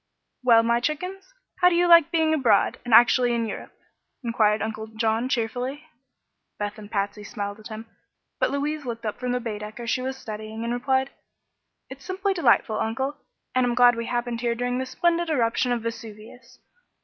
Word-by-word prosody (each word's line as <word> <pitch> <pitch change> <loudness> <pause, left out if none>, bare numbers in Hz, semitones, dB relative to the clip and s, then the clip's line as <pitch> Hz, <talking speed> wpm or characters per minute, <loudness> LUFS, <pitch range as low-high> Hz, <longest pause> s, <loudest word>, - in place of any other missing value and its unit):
"Well, 235 -3 +5
my 235 +1 +2
chickens, 365 - -4 0.3
how 360 - +6
do 350 - 0
you 350 +1 +3
like 335 -2 +7
being 320 -2 +2
abroad, 240 -9 +2
and 245 - -6
actually 240 +1 +6
in 230 -1 0
Europe?" 220 - -7 0.5
enquired 215 -3 +2
Uncle 220 0 -4
John, 225 +2 -1
cheerfully. 250 +4 -2 0.7
Beth 205 +1 -4
and 205 -1 -11
Patsy 205 0 -2
smiled 205 -1 -5
at 215 - -10
him, 220 0 -8 0.5
but - - +2
Louise 295 +2 -2
looked 235 -2 -6
up 210 - -3
from 250 -1 -2
the 250 - 0
Baedecker 215 0 -6
she 255 +2 0
was 265 +1 -4
studying 220 -1 -7
and 235 +1 -2
replied: 265 +2 0 0.8
"It's 265 0 -11
simply 385 +1 -1
delightful, 235 - +2
Uncle, 265 +6 -2 0.4
and 255 - +2
I'm 245 -1 0
glad 245 -1 +6
we 230 0 -4
happened 240 -1 -2
here 235 -1 0
during 245 +1 -2
this 260 0 -4
splendid 345 +3 +1
eruption 245 -3 +1
of 240 -2 -1
Vesuvius. 230 +2 -9
240 Hz, 180 wpm, -25 LUFS, 220-265 Hz, 0.8 s, like